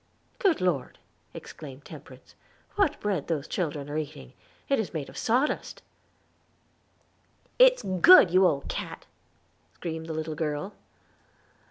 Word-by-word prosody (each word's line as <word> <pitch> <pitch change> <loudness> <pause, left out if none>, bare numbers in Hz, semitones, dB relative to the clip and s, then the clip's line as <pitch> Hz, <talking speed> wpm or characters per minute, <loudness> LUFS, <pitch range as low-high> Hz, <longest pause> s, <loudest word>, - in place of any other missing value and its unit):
"Good 385 - +2
Lord!" 170 -8 -1 0.3
exclaimed 140 -2 -11
Temperance, - - -13 0.4
"what 395 -8 +1
bread 195 -8 -2
those 160 -3 -2
children 150 -5 -3
are 150 +1 -3
eating! 145 -4 -8 0.3
It 275 - +1
is 200 -5 -4
made 145 -3 -4
of - - -14
sawdust." 250 +5 -1 1.8
"It's - - +6
good, 190 - +6
you 185 +1 +5
old 140 -4 -2
cat," - - -6 0.7
screamed 160 -1 -6
the 160 - -4
little 155 0 -4
girl. 155 +4 -3
165 Hz, 125 wpm, -27 LUFS, 150-210 Hz, 1.8 s, It's